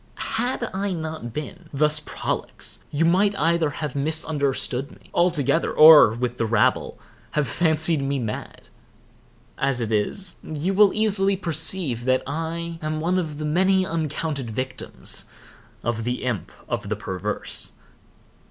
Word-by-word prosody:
Had 240 +1 0
I 195 0 -1
not 160 -7 -5
been 155 +5 -7
thus 150 +1 +3
prolix, 150 - -4
you 155 +3 +1
might 195 +4 +3
either 165 -1 +2
have 150 0 -5
misunderstood 140 -3 0
me - - -19
altogether, 165 -3 +2
or, 155 -8 +9
with 125 0 -3
the 115 - +1
rabble, 110 -1 +1 0.4
have 150 -2 +2
fancied 160 +2 +2
me 140 0 -1
mad. 110 -4 -5 1.0
As 135 -2 +1
it 115 -2 -2
is, 170 - 0
you 155 +5 -2
will 205 0 +6
easily 200 -2 +2
perceive 160 -7 -2
that 130 0 +2
I 165 +3 -4
am 155 0 -2
one 180 +4 +1
of 155 -4 -4
the 155 - -4
many 190 +4 +3
uncounted 155 -5 -3
victims 130 +4 -4 0.6
of 115 -1 -1
the 125 +2 -2
Imp 120 -6 -2 0.2
of - - -3
the - - 0
Perverse. 95 +3 -4
155 Hz, 140 wpm, -24 LUFS, 130-170 Hz, 1.0 s, or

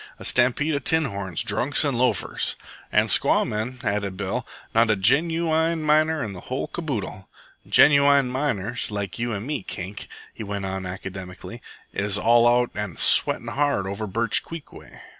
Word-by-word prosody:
"A - - -10
stampede 130 +5 +2
of 140 -2 -2
tin 160 -1 +2
horns, 100 - -3
drunks, 135 +4 0
an' 140 - 0
loafers." 125 +1 0 0.4
"An' - - +3
squaw - - +3
men," 110 +4 -4
added 100 -2 -2
Bill. 100 -1 -3 0.3
"Not 115 0 +3
a 110 - +4
genooine 160 - +2
miner 155 0 +2
in 105 -3 -5
the 90 - -9
whole 130 +1 -2
caboodle." 115 - -5 0.4
"Genooine 140 -2 +5
miners 125 -4 -2
like 100 -1 -5
you 120 0 -2
an' 100 +3 -5
me, 145 -2 -3
Kink," 95 +2 -7 0.3
he - - -8
went 100 -1 -4
on 95 -1 -4
academically, 95 -1 -8 0.3
"is 100 0 0
all 120 +2 +4
out 120 0 +2
an' 105 -5 -5
sweatin' - - +4
hard 140 -9 0
over 100 +3 -4
Birch 110 +1 +1
Creek 165 -3 -10
way. - - -14
115 Hz, 165 wpm, -23 LUFS, 100-145 Hz, 0.4 s, Genooine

